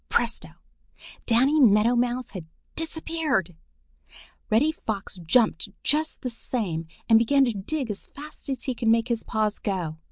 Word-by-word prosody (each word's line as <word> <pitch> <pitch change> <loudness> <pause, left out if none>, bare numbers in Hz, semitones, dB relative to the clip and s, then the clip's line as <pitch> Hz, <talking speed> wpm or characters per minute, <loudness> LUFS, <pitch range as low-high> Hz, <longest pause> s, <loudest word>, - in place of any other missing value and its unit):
Presto! - - 0 0.8
Danny 265 +7 +4
Meadow 225 -1 +5
Mouse 245 +1 0
had 180 -5 -8 0.3
disappeared! 320 - -1 0.9
Reddy 265 +9 +4
Fox 210 -10 -5
jumped 210 +1 +2
just 310 +2 0
the 250 - -1
same 190 -9 -3 0.2
and 225 -1 +7
began 270 +4 +4
to 240 - 0
dig 230 +5 -3
as 200 - -6
fast 300 0 -11
as 260 -3 -3
he 260 - -1
could 230 -1 -3
make 230 +2 +3
his 235 -2 0
paws 215 -1 -1
go. 175 -6 -3
235 Hz, 150 wpm, -26 LUFS, 205-275 Hz, 0.9 s, and